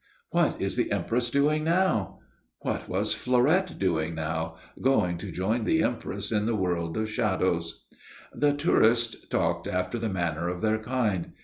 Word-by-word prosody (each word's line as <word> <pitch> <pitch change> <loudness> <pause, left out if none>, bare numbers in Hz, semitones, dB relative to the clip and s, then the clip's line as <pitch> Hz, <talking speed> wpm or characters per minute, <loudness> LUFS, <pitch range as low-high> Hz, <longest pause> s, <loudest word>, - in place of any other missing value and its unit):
"What - - +2
is - - -1
the - - 0
Empress 120 +1 0
doing 150 +4 +2
now?" 170 - +1 0.4
What - - -3
was - - 0
Fleurette 150 +10 +2
doing 80 -4 0
now? 80 +1 -3 0.2
Going 90 -10 +2
to - - -6
join 110 +6 0
the 160 +8 +2
Empress 100 -4 -2
in 105 -1 +1
the 115 - +1
world 85 -4 -1
of 110 0 0
shadows. 95 -6 -1 0.5
The 145 0 +2
tourists 120 -6 +2
talked - - 0
after 90 +5 -2
the 110 0 -1
manner 85 -3 -1
of 90 0 -3
their 110 0 +1
kind. 110 -7 -1
110 Hz, 155 wpm, -27 LUFS, 90-125 Hz, 0.5 s, What